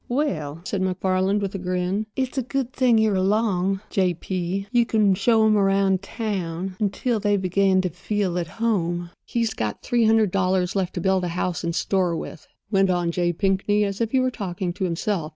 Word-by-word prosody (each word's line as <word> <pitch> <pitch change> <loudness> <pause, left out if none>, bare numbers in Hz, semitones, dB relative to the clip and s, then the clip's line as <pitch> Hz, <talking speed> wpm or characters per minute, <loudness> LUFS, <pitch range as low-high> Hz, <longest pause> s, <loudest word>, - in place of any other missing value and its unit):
"Well," 165 - -2
said 190 +1 -2
MacFarland, 190 +2 +1
with 195 -1 -3
another 185 -2 -5
grin, 185 +4 -1
"it's 260 0 -2
a 265 - +1
good 260 +1 -3
thing 250 -5 +3
you 220 -1 +3
are - - 0
along, 195 -1 +1
J. 185 -4 +1
P.; 185 +2 -3
you 240 -1 +4
can 215 -4 +2
show 220 +3 +3
'em 215 -1 +4
around 195 -1 +2
town 190 -4 -4
until 220 +3 0
they 205 0 +2
begin 190 0 +2
to 185 - -1
feel 180 +1 -2
at 170 - -3
home." 175 -6 -1 0.2
"He's 230 -2 -1
got 105 -2 -4
three 240 -2 +2
hundred 220 -3 +3
dollars 185 -1 +1
left 190 -2 -1
to 175 - -2
build 190 0 +2
a - - 0
house 180 -1 -1
and 170 -1 -2
store 185 -3 +1
with," 160 0 -7 0.2
went 195 -2 +3
on 175 -2 +1
J. 175 0 0
Pinkney, 195 +3 +1
as 200 +1 -3
if 230 - +1
he 265 - +2
were 255 0 +1
talking 185 -5 -4
to 190 +1 -2
himself. 170 -1 -2
195 Hz, 205 wpm, -23 LUFS, 180-215 Hz, 0.2 s, you